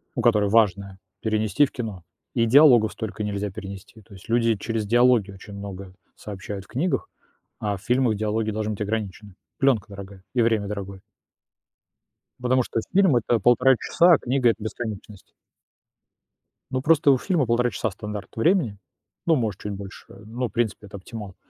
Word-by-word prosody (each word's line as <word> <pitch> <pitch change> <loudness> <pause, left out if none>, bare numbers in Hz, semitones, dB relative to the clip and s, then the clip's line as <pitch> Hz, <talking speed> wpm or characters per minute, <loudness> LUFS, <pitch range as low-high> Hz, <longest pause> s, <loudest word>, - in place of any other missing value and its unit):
ну, - - -1
которое 105 -3 +3
важное, 100 -3 +2 0.2
перенести 110 +4 +2
в 140 - -9
кино, 110 -8 -6 0.3
и 115 -2 +3
диалогов 120 -3 +6
столько 105 -1 -5
нельзя 105 0 -2
перенести, 100 +2 -10
то 100 - -18
есть 95 +3 -14
люди 115 -1 +2
через 110 +1 -3
диалоги 120 -2 +3
очень 100 +2 -12
много 100 -2 -8 0.2
сообщают 100 -1 -7
в - - -23
книгах, 165 +8 -2 0.5
а 105 -1 -1
в - - -16
фильмах 125 0 +1
диалоги 110 +1 -1
должны 110 0 -2
быть 105 - -8
ограничены. 105 -2 -4 0.2
Плёнка 135 -7 +2
дорогая 100 -1 -10
и 120 - +3
время 110 -3 +1
дорогое. 100 -2 -6 1.4
Потому 125 +1 +2
что 115 - -2
фильм- 185 -8 +4
это 120 0 +1
1,5 125 +3 +4
часа, 175 +7 +4
а - - +2
книга- 125 -1 +2
это 110 - -4
бесконечность. 110 -3 -6 1.4
Ну, 130 - -1
просто 150 -1 +4
у 135 - +4
фильма 165 -3 0
1,5 120 +1 +2
часа- 110 +1 -2
стандарт 105 +1 -7
времени, 120 - +1 0.5
ну, 165 -2 +4
может, 110 -7 -2
чуть 105 - -5
больше, 100 0 -9 0.2
ну, 120 +3 -3
в - - -22
принципе, 110 -2 -2
это 100 - -9
оптимал, 100 -1 -9
110 Hz, 170 wpm, -24 LUFS, 100-120 Hz, 1.4 s, диалогов